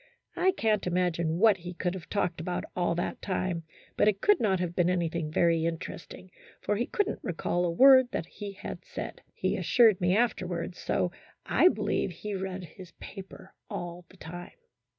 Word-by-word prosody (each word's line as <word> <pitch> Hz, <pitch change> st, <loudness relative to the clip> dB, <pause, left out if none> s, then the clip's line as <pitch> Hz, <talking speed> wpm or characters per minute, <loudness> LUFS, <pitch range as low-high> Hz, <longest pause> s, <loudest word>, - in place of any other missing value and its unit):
I 375 Hz, -, +3 dB
can't 215 Hz, -, +1 dB
imagine 170 Hz, -2 st, 0 dB
what 215 Hz, 0 st, +5 dB
he 180 Hz, 0 st, -8 dB
could 180 Hz, 0 st, -1 dB
have 180 Hz, -3 st, -8 dB
talked 180 Hz, -5 st, -1 dB
about 180 Hz, +2 st, -3 dB
all 175 Hz, -1 st, +1 dB
that 175 Hz, -, -3 dB
time, 185 Hz, -3 st, -2 dB, 0.3 s
but -, -, +3 dB
it 205 Hz, -2 st, +2 dB
could 415 Hz, -, +4 dB
not 195 Hz, -5 st, +2 dB
have 175 Hz, -1 st, -2 dB
been 175 Hz, -1 st, +3 dB
anything 170 Hz, -3 st, -1 dB
very 165 Hz, 0 st, +3 dB
interesting, 170 Hz, +2 st, -5 dB, 0.3 s
for 210 Hz, -, -1 dB
he 235 Hz, +4 st, -1 dB
could 410 Hz, -4 st, 0 dB
n't -, -, -4 dB
recall 175 Hz, 0 st, -1 dB
a -, -, +1 dB
word 260 Hz, +6 st, +7 dB
that 165 Hz, -, -3 dB
he 200 Hz, +3 st, -8 dB
had 190 Hz, -, -8 dB
said, -, -, -7 dB
he -, -, 0 dB
assured 225 Hz, -6 st, +4 dB
me 180 Hz, +2 st, +3 dB
afterwards, 180 Hz, -7 st, -1 dB
so 175 Hz, -, 0 dB, 0.3 s
I -, -, +5 dB
believe 365 Hz, -, +1 dB
he 205 Hz, +4 st, -6 dB
read 190 Hz, -1 st, -4 dB
his 175 Hz, +1 st, -12 dB
paper 195 Hz, -2 st, -10 dB, 0.2 s
all 175 Hz, 0 st, -6 dB
the 185 Hz, -, -18 dB
time. 175 Hz, +1 st, -9 dB
180 Hz, 185 wpm, -29 LUFS, 170-205 Hz, 0.3 s, word